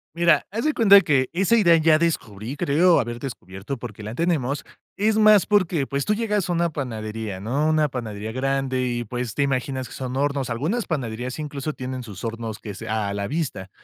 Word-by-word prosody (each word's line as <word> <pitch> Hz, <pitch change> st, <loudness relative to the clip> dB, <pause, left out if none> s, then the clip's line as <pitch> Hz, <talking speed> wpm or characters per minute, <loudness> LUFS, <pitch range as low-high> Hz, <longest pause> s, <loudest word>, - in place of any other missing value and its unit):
Mira, 170 Hz, -2 st, +4 dB
haz 225 Hz, +8 st, -3 dB
de 305 Hz, -, +2 dB
cuenta 200 Hz, -3 st, +7 dB
que 135 Hz, -5 st, +2 dB
esa 195 Hz, +6 st, +3 dB
idea 170 Hz, -7 st, +6 dB
ya 155 Hz, -1 st, +4 dB
descubrí, 125 Hz, -7 st, -2 dB
creo 165 Hz, +4 st, +4 dB
haber 120 Hz, -1 st, -3 dB
descubierto 105 Hz, -1 st, -6 dB
porque 110 Hz, -3 st, -8 dB
la 110 Hz, +3 st, -6 dB
tenemos, 145 Hz, -5 st, 0 dB, 0.3 s
es 215 Hz, +2 st, +2 dB
más 215 Hz, -3 st, +6 dB
porque, 180 Hz, -8 st, +2 dB
pues, 140 Hz, 0 st, -2 dB
tú 210 Hz, -, +1 dB
llegas 210 Hz, -5 st, -1 dB
a -, -, +1 dB
una 170 Hz, -1 st, +1 dB
panadería, 110 Hz, -7 st, -5 dB
¿no? 135 Hz, +9 st, 0 dB
Una 155 Hz, -2 st, +2 dB
panadería 110 Hz, -4 st, -5 dB
grande 135 Hz, 0 st, -1 dB
y, 120 Hz, -1 st, -2 dB
pues, 120 Hz, 0 st, -4 dB
te 140 Hz, -, +2 dB
imaginas 130 Hz, -1 st, -1 dB
que -, -, -12 dB
son 130 Hz, 0 st, -4 dB
hornos. 140 Hz, -2 st, 0 dB
Algunas 160 Hz, -, -1 dB
panaderías 125 Hz, -4 st, -3 dB
incluso 150 Hz, 0 st, -4 dB
tienen 130 Hz, -1 st, -5 dB
sus 105 Hz, -4 st, -10 dB
hornos 115 Hz, -1 st, -4 dB
que 105 Hz, -3 st, -8 dB
sea, 110 Hz, 0 st, -3 dB
a -, -, -3 dB
la 100 Hz, 0 st, -3 dB
vista. 140 Hz, -, -3 dB
135 Hz, 200 wpm, -23 LUFS, 115-165 Hz, 0.3 s, cuenta